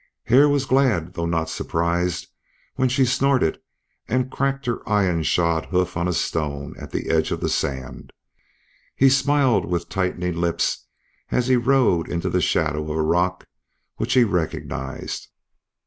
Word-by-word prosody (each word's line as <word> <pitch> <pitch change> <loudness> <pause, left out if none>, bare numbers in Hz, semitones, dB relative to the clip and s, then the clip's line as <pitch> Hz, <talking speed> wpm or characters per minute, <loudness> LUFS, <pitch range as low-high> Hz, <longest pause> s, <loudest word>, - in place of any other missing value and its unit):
Hare 135 +5 +5
was 140 -1 +1
glad 120 -11 +2
though 85 -2 -2
not 80 -1 0
surprised 85 +2 -1 0.5
when 130 0 +1
she 130 +1 +3
snorted 125 - +1 0.5
and 130 +2 0
cracked 135 0 -1
her 120 -1 -2
iron 95 -6 +2
shod 85 0 +1
hoof 90 -1 0
on 85 +1 0
a - - 0
stone 75 -3 -2
at - - -8
the - - -3
edge 80 -1 +2
of - - -2
the - - -1
sand. 65 -1 -3 0.8
He 135 - +5
smiled 135 -3 +3
with 85 -1 -3
tightening 90 -2 -2
lips 85 -1 -1 0.4
as 125 - +1
he 130 0 +3
rode 120 -9 +2
into 85 -1 -2
the - - +1
shadow 75 -1 +1
of 75 +1 -4
a 80 - +1
rock 90 +3 0 0.5
which - - -1
he 125 - +6
recognized. 80 - -3
90 Hz, 155 wpm, -22 LUFS, 80-130 Hz, 0.8 s, he